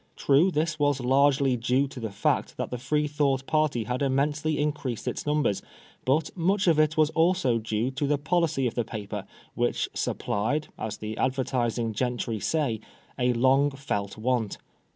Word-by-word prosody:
True, 145 +7 +4
this 155 -1 -1
was 145 -2 +2
largely 135 +1 +3
due 125 +4 +1
to 130 - -9
the 115 -2 -3
fact 100 - -1
that - - -3
the 125 - -3
Freethought 145 -1 0
party 155 -7 +1
had 125 +4 -3
immensely 145 +3 +1
increased 145 -5 -2
in - - +1
numbers; 150 -9 +1 0.4
but 150 +4 +1
much 190 +3 +1
of 165 -4 +4
it 155 +1 +2
was 155 0 +4
also 165 -8 +2
due 110 +3 -1
to 140 +2 -2
the 145 0 +2
policy 155 -2 +1
of 120 - 0
the 120 - 0
paper, 105 -2 -6 0.3
which - - 0
supplied, 135 +10 -1
as 110 - -5
the 110 0 -5
advertising 120 -3 0
gentry 120 -1 -2
say, 115 - 0 0.4
"a 125 0 +3
long 135 +4 +4
felt 120 -8 -4
want." 115 -2 -1
135 Hz, 165 wpm, -27 LUFS, 120-150 Hz, 0.4 s, True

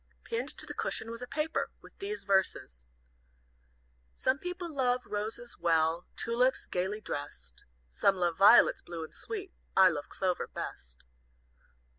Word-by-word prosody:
Pinned 465 +1 -2
to - - -6
the - - -6
cushion 230 - -2
was 230 +1 -7
a 250 - -5
paper, 305 +4 -1
with - - -16
these 410 +2 -4
verses: 190 - 0 1.3
"Some 260 +2 +1
people 360 -1 -5
love 250 -2 +1
roses 220 +3 -4
well, 165 0 +2
Tulips, 250 +3 +1
gayly 190 +4 -2
dressed, 65 - -7 0.3
Some 195 - +3
love 175 -2 0
violets 200 +6 +7
blue 170 -2 -6
and 160 - -9
sweet, 395 -4 -6 0.2
I 190 -1 +9
love 150 -4 -4
Clover 185 -2 -1
best. - - -7
205 Hz, 140 wpm, -31 LUFS, 170-260 Hz, 1.3 s, I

